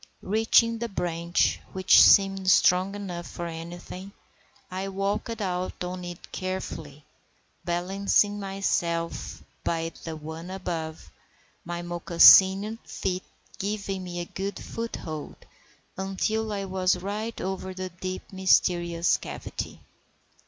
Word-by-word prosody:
Reaching 225 +2 +3
the 235 0 -3
branch, 170 -2 0
which 185 0 +6
seemed 195 -1 +6
strong 185 +2 +4
enough 180 -4 -5
for 175 - -6
anything, 175 +4 -8 0.6
I 190 +1 -3
walked 200 +4 -2
out 180 -2 -3
on 180 0 -5
it 175 -1 -9
carefully, 160 -6 -5 0.6
balancing 195 +4 +1
myself 175 -4 -2 0.2
by 165 0 -1
the 165 -1 -5
one 160 +3 -8
above, 165 - -5 0.5
my 175 0 -5
moccasined 190 +5 +6
feet 185 -1 -3 0.4
giving 200 -1 -3
me 175 -1 -5
a 175 - -3
good 195 +3 -5
foothold, 165 -10 -6 0.6
until 215 +3 -1
I 200 -1 -2
was 185 -1 +1
right 210 +5 -4
over 190 0 -3
the 185 0 -5
deep, 185 +1 -5
mysterious 175 -2 +3
cavity. - - -7
185 Hz, 110 wpm, -27 LUFS, 175-195 Hz, 0.6 s, which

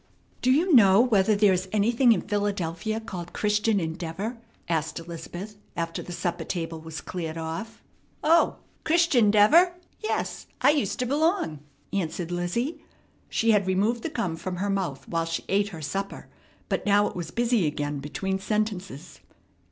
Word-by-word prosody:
"Do 255 - +3
you 330 +6 +3
know 200 -5 +7
whether 215 -4 +4
there 200 -1 +5
is 185 +1 -2
anything 230 +4 +4
in 225 - +3
Philadelphia 205 0 -2
called 180 -6 -7
'Christian 210 0 +1
Endeavor'?" 175 +7 -4 0.3
asked 160 -2 -1
Elizabeth 175 +5 -7 0.2
after 165 0 -2
the - - -9
supper 175 0 -2
table 165 -2 -4
was 160 0 -7
cleared 165 -3 -5
off. 165 +8 -6 0.4
"O, 330 +2 +4 0.3
Chrishun'deavor! 310 - +5 0.3
Yes, 435 - -3
I 275 - +5
used 220 -10 0
t' 250 - -1
b'long," 300 - +1 0.3
answered 175 -2 -2
Lizzie. 235 - -2 0.5
She 225 0 +2
had 205 -3 +3
removed 210 +6 +1
the 330 - -3
gum 185 - -2
from 185 +2 -4
her 200 +3 -1
mouth 185 -9 -3
while 165 -1 -1
she 165 0 -3
ate 200 +1 +2
her 165 -6 -8
supper, 195 +6 -4 0.4
but - - -1
now 205 0 +4
it - - -4
was 175 -2 -4
busy 235 -6 +1
again 145 -1 -2
between 190 +7 -3
sentences. 195 -6 -3
195 Hz, 155 wpm, -26 LUFS, 170-225 Hz, 0.5 s, know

